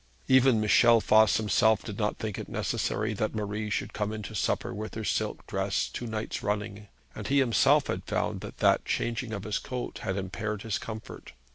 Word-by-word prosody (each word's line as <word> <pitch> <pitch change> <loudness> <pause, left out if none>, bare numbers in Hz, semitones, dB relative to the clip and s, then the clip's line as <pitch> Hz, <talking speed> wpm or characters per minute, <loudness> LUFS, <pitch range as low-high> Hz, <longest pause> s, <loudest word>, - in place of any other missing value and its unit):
Even 130 -3 +5
Michel 115 +2 +5
Voss 110 -1 +5
himself 110 0 +3
did 105 0 -7
not 105 -1 0
think 110 -3 -4
it - - -7
necessary 110 +1 -1
that 110 +1 -2
Marie 105 0 -3
should - - -2
come 105 0 -2
in 110 -1 -5
to 105 - -7
supper 105 - -1
with 110 +2 -6
her 110 - -4
silk - - -2
dress - - -1
two 120 - -6
nights 110 0 -4
running; 105 0 -3 0.3
and 105 - -6
he 140 - +2
himself 130 -4 +4
had - - -3
found - - -1
that - - -8
that - - +3
changing 120 0 -2
of 100 -3 -4
his 105 -1 -1
coat 125 -1 -5
had 95 - -3
impaired 100 +2 -4
his 110 -3 -2
comfort. 110 -1 -8
110 Hz, 200 wpm, -28 LUFS, 105-110 Hz, 0.3 s, Even